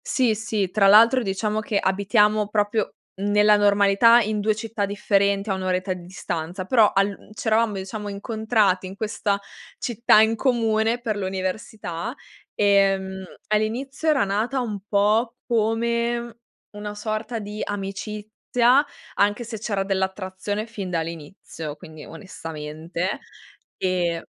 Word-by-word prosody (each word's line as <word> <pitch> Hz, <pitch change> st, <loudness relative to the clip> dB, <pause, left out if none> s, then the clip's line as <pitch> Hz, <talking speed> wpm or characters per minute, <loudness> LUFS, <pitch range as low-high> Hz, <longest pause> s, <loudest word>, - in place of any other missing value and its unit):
Sì, 255 Hz, -6 st, +2 dB
sì, 210 Hz, -3 st, -2 dB
tra 200 Hz, -1 st, +4 dB
l'altro 230 Hz, +6 st, +7 dB
diciamo 210 Hz, +1 st, -1 dB
che 210 Hz, -1 st, -1 dB
abitiamo 210 Hz, +2 st, +2 dB
proprio 210 Hz, 0 st, 0 dB, 0.3 s
nella 210 Hz, +1 st, +4 dB
normalità 205 Hz, +3 st, +5 dB
in 215 Hz, -1 st, -1 dB
2 215 Hz, +1 st, +1 dB
città 215 Hz, -1 st, -3 dB
differenti 200 Hz, 0 st, +1 dB
a -, -, +2 dB
1 190 Hz, -, -4 dB
oretta 185 Hz, +1 st, -1 dB
di 180 Hz, -, -9 dB
distanza. 180 Hz, 0 st, -5 dB
Però 220 Hz, 0 st, +4 dB
al 195 Hz, +1 st, +2 dB
uhm, -, -, -20 dB
c'eravamo 220 Hz, 0 st, +1 dB
diciamo 205 Hz, +2 st, -5 dB
incontrati 205 Hz, -2 st, 0 dB
in 190 Hz, -, -9 dB
questa 205 Hz, -1 st, -1 dB, 0.4 s
città 235 Hz, -2 st, +3 dB
in 220 Hz, +1 st, +3 dB
comune 225 Hz, -1 st, +1 dB
per 230 Hz, -3 st, -2 dB
l'università. 190 Hz, +1 st, -4 dB, 0.4 s
Ehm, 195 Hz, -1 st, +2 dB, 0.3 s
all'inizio 240 Hz, +8 st, -1 dB
era 295 Hz, -6 st, +3 dB
nata 215 Hz, +7 st, -1 dB
un 220 Hz, -5 st, -3 dB
po' 215 Hz, +4 st, +2 dB
come 235 Hz, +1 st, 0 dB, 0.3 s
una 210 Hz, 0 st, -7 dB
sorta 215 Hz, +2 st, -3 dB
di 210 Hz, 0 st, -6 dB
amicizia, 210 Hz, +6 st, 0 dB, 0.3 s
anche 205 Hz, +4 st, +2 dB
se 225 Hz, -1 st, -7 dB
c'era 200 Hz, -3 st, -1 dB
dell'attrazione 190 Hz, +2 st, -2 dB
fin 210 Hz, -5 st, -6 dB
dall'inizio, 165 Hz, -2 st, -5 dB
quindi 155 Hz, -1 st, -12 dB
onestamente, 165 Hz, +1 st, -5 dB, 0.6 s
ehm 175 Hz, -3 st, -1 dB
205 Hz, 130 wpm, -23 LUFS, 190-220 Hz, 0.6 s, l'altro